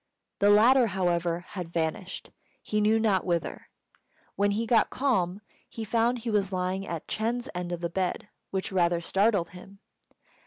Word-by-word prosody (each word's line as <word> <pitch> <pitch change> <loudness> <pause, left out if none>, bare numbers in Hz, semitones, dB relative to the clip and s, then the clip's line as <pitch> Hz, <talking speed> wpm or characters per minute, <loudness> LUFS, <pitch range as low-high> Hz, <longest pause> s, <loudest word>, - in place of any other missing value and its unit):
The 200 - +4
latter, 235 +4 +6
however, 175 -3 0
had 180 -4 -6
vanished, 170 +3 -3 0.3
he 210 0 0
knew 215 +2 +3
not 205 -4 +2
whither. 170 -2 -2 0.7
When 205 0 +2
he 215 +3 0
got 230 0 +3
calm, 205 -8 0 0.3
he 225 - -6
found 235 +3 +1
he 230 -1 -4
was 200 -2 +1
lying 185 +1 -2
at 170 -2 -5
Ch'êng's 240 +3 -2
end 180 -1 -4
of 175 -1 -4
the 170 - 0
bed, 185 +2 -2 0.2
which 190 0 -3
rather 175 -2 +2
startled 195 0 +1
him. 185 +2 -13
195 Hz, 160 wpm, -28 LUFS, 175-220 Hz, 0.7 s, latter